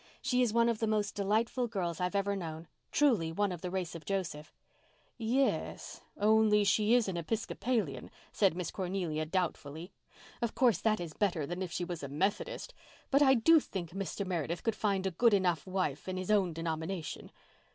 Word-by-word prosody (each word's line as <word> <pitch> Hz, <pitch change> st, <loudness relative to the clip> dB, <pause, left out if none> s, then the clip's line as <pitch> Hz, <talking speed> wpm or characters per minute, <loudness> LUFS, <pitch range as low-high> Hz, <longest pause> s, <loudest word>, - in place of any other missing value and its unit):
"She 255 Hz, -2 st, +1 dB
is 240 Hz, -3 st, +2 dB
one 235 Hz, +1 st, +3 dB
of 230 Hz, -2 st, 0 dB
the 225 Hz, -, 0 dB
most 210 Hz, -1 st, 0 dB
delightful 220 Hz, +5 st, 0 dB
girls 180 Hz, -6 st, -3 dB
I've 180 Hz, +2 st, -1 dB
ever 200 Hz, 0 st, +1 dB
known—truly 165 Hz, -, -1 dB
one 205 Hz, +3 st, 0 dB
of 175 Hz, -2 st, -6 dB
the 180 Hz, -, -3 dB
race 180 Hz, -3 st, -3 dB
of 165 Hz, -2 st, -8 dB
Joseph." 175 Hz, -6 st, -3 dB, 0.7 s
"Ye—s—only 220 Hz, -3 st, +1 dB
she 210 Hz, +4 st, +3 dB
is 240 Hz, -4 st, +3 dB
an 185 Hz, -2 st, -2 dB
Episcopalian," 215 Hz, -, -2 dB, 0.2 s
said 195 Hz, -5 st, +2 dB
Miss 180 Hz, -2 st, -3 dB
Cornelia 175 Hz, -5 st, -2 dB
doubtfully. 170 Hz, -1 st, -3 dB, 0.5 s
"Of 235 Hz, -2 st, -1 dB
course, 240 Hz, -8 st, +4 dB
that 215 Hz, -1 st, +1 dB
is 170 Hz, -3 st, -5 dB
better 175 Hz, -7 st, 0 dB
than 175 Hz, +4 st, -5 dB
if 185 Hz, -2 st, -3 dB
she 175 Hz, -1 st, -2 dB
was 175 Hz, -2 st, -5 dB
a 140 Hz, -, -4 dB
Methodist—but 205 Hz, -, -2 dB
I 265 Hz, -2 st, +6 dB
do 320 Hz, +8 st, +6 dB
think 180 Hz, -, -6 dB
Mr. 195 Hz, +1 st, -4 dB
Meredith 170 Hz, -2 st, -2 dB
could 225 Hz, -2 st, 0 dB
find 200 Hz, -3 st, 0 dB
a 190 Hz, -, 0 dB
good 225 Hz, +5 st, +4 dB
enough 180 Hz, -6 st, +1 dB
wife 185 Hz, -6 st, -2 dB
in 185 Hz, -, -3 dB
his 185 Hz, +2 st, -2 dB
own 195 Hz, -4 st, +3 dB
denomination. 160 Hz, +1 st, -4 dB
190 Hz, 175 wpm, -32 LUFS, 170-220 Hz, 0.7 s, I